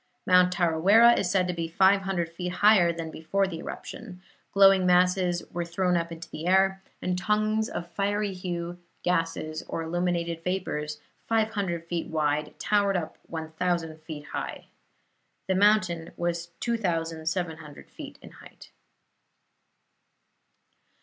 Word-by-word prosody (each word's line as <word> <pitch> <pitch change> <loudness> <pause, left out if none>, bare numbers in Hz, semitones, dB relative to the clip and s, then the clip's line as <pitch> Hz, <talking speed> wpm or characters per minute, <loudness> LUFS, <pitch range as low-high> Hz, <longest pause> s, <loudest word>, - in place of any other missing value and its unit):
Mount 180 0 +5
Tarawera 185 +7 +5
is 185 - 0
said 180 -1 +2
to 180 - -1
be 165 -1 -3
five 190 +4 +4
hundred 190 -3 -1
feet 180 +2 -5
higher 195 -3 +5
than 165 -1 -6
before 195 +6 0
the 170 -4 -5
eruption; 180 +1 -8 0.3
glowing 195 -1 +6
masses 180 0 +3
were 175 - -2
thrown 180 +1 0
up 170 0 -1
into 165 0 -8
the 160 +3 -5
air, 190 +1 +3 0.2
and 180 0 -1
tongues 215 +2 +1
of 175 - -5
fiery 205 +2 -1
hue, 175 -1 -5 0.2
gases 165 -2 -1
or 165 - -3
illuminated 170 0 -2
vapors, 150 -5 -3 0.3
five 220 -1 +1
hundred 175 -6 -3
feet 170 -1 -3
wide, 150 -1 -1
towered 200 -2 +2
up 160 -3 -5
one 160 -1 -6
thousand 165 -1 -2
feet 155 -2 -8
high. - - -5 0.8
The 190 - +2
mountain 185 -4 +2
was 170 0 -2
2,700 165 -6 -3
feet - - -10
in - - -12
height. - - -15
175 Hz, 135 wpm, -27 LUFS, 165-190 Hz, 0.8 s, glowing